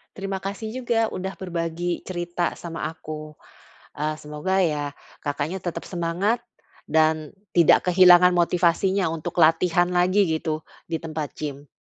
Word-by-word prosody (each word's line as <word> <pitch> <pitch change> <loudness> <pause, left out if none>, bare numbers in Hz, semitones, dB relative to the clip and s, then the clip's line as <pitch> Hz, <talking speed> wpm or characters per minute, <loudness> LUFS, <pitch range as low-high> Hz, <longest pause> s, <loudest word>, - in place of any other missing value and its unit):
Terima 195 -1 -4
kasih 205 +3 -5
juga 230 -2 +2
sudah 190 +1 -4
berbagi 175 -1 -3
cerita 175 -1 -3
sama 170 -1 -5
aku. 155 -1 -8 0.6
Eee, 155 +1 -1
semoga 150 +6 -2
ya 150 -4 0 0.3
Kakaknya 145 +5 -2
tetap 170 -1 -4
semangat 185 +7 -1 0.4
dan 155 0 +2 0.2
tidak 170 +1 +5
kehilangan 180 0 +7
motivasinya 175 +2 +2
untuk 160 -2 -5
latihan 170 +2 +4
lagi 180 +3 +3
gitu 160 -1 -2 0.2
di 165 -1 -2
tempat 155 -3 -5
gym. 145 -1 -6
170 Hz, 125 wpm, -24 LUFS, 155-185 Hz, 0.6 s, kehilangan